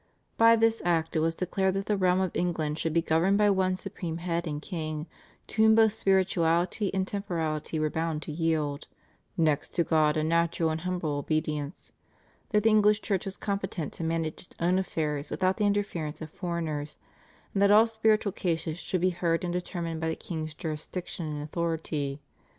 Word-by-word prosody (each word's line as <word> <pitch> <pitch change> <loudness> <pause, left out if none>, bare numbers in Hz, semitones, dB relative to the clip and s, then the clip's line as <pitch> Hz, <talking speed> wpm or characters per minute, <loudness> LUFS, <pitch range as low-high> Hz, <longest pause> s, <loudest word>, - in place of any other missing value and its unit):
By 230 0 +7
this 225 0 +2
Act 165 -2 +1
it - - +3
was 165 +1 +1
declared 190 +1 0
that 195 0 -2
the 210 - +1
realm 185 -1 +2
of 185 -2 0
England 160 -3 -1
should 165 - 0
be 165 +1 +2
governed 170 +6 +3
by 205 -1 +4
one 185 -1 +2
supreme 170 -2 -5
head 170 0 -2
and 150 -1 -3
king, 155 -2 -4 0.4
to 220 - -1
whom 220 0 +7
both 220 -1 +5
spirituality 185 -1 +2
and 190 -1 -1
temporality 165 -6 -2
were 155 -1 0
bound 160 -1 -2
to - - -6
yield, 155 -2 -1 0.5
"next 155 -3 +1
to 170 - +3
God 155 -2 +2
a 155 - +1
natural 165 0 +1
and 160 0 -3
humble 175 -5 -2
obedience," 150 +1 -3 0.6
that 210 -2 +2
the 225 - +5
English 210 0 +4
Church 195 -4 -1
was 195 - -6
competent 195 -6 -3
to - - -5
manage 165 -1 -2
its - - -16
own 180 +2 +2
affairs 150 -5 -2
without 185 0 +1
the 210 - +2
interference 200 -7 -1
of 155 -1 -8
foreigners, 160 -5 -3 0.6
and 195 - 0
that 200 - +6
all 215 +2 +7
spiritual 220 -2 +2
cases 165 -3 -2
should 185 -1 -2
be 185 +1 +3
heard 170 -1 0
and 175 -1 -2
determined 170 -2 -3
by 160 - 0
the 160 - -1
king's 155 -3 -5
jurisdiction 165 +1 -5
and 150 -1 -4
authority. 155 -3 -2
170 Hz, 185 wpm, -28 LUFS, 155-190 Hz, 0.6 s, By